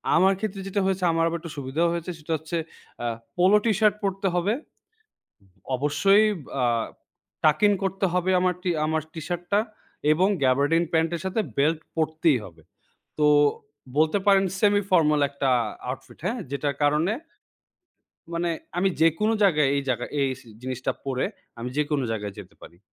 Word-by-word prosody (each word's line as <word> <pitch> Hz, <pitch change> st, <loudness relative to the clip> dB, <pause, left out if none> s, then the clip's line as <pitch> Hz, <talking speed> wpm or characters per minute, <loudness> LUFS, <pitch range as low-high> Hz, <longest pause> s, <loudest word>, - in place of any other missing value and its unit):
আমার 190 Hz, +3 st, +5 dB
ক্ষেত্রে 200 Hz, -2 st, -4 dB
যেটা 200 Hz, +1 st, 0 dB
হয়েছে 190 Hz, -1 st, 0 dB
আমার 165 Hz, 0 st, +2 dB
আবার 170 Hz, 0 st, -2 dB
একটু 165 Hz, -2 st, -8 dB
সুবিধা 140 Hz, +4 st, -1 dB
হয়েছে 170 Hz, +1 st, -3 dB
সেটা 155 Hz, +1 st, -8 dB
হচ্ছে 160 Hz, +3 st, -4 dB, 0.4 s
অ্যা 120 Hz, -, -2 dB, 0.3 s
পোলো 185 Hz, +4 st, +5 dB
টিশার্ট 210 Hz, -1 st, +3 dB
পরতে 195 Hz, 0 st, -1 dB
হবে। 180 Hz, +5 st, +1 dB, 1.2 s
অবশ্যই 170 Hz, +10 st, +4 dB, 0.2 s
বা 130 Hz, -3 st, -1 dB, 0.8 s
tucking 200 Hz, +7 st, +4 dB
করতে 195 Hz, 0 st, 0 dB
হবে। 180 Hz, +1 st, +1 dB
আমার 180 Hz, -1 st, +2 dB
টি 180 Hz, -, 0 dB, 0.2 s
আমার 160 Hz, 0 st, 0 dB
টি-শার্টটা 175 Hz, +4 st, -1 dB, 0.5 s
এবং 185 Hz, +5 st, +3 dB, 0.2 s
gabardin 145 Hz, +6 st, +3 dB
প্যান্টের 165 Hz, +1 st, +1 dB
সাথে 190 Hz, +4 st, 0 dB, 0.2 s
বেল্ট 155 Hz, +3 st, +2 dB, 0.2 s
পরতেই 160 Hz, -2 st, +2 dB
হবে। 80 Hz, -4 st, -14 dB, 0.6 s
তো 150 Hz, -, +4 dB, 0.7 s
বলতে 155 Hz, +5 st, +3 dB
পারেন 195 Hz, -1 st, +6 dB, 0.2 s
semi 205 Hz, -1 st, +4 dB
formal 150 Hz, -4 st, +4 dB
একটা 140 Hz, -1 st, -1 dB, 0.4 s
outfit 130 Hz, -, -8 dB
হ্যাঁ? 240 Hz, +3 st, -1 dB
যেটার 140 Hz, 0 st, -1 dB
কারণে 150 Hz, +7 st, +2 dB, 1.2 s
মানে 170 Hz, 0 st, 0 dB, 0.3 s
আমি 195 Hz, +2 st, +3 dB
যেকোনো 165 Hz, +7 st, +3 dB
জায়গায় 155 Hz, -7 st, +4 dB
এই 140 Hz, -, 0 dB
জায়গায় 125 Hz, 0 st, -2 dB
এই 135 Hz, -, +2 dB, 0.3 s
জিনিসটা 130 Hz, 0 st, -2 dB
পরে 130 Hz, -1 st, -1 dB, 0.4 s
আমি 120 Hz, -, -3 dB
যেকোনো 145 Hz, -3 st, 0 dB
জায়গায় 105 Hz, -2 st, -4 dB
যেতে 100 Hz, 0 st, -14 dB
পারি। 85 Hz, -, -14 dB
165 Hz, 145 wpm, -25 LUFS, 145-190 Hz, 1.2 s, পারেন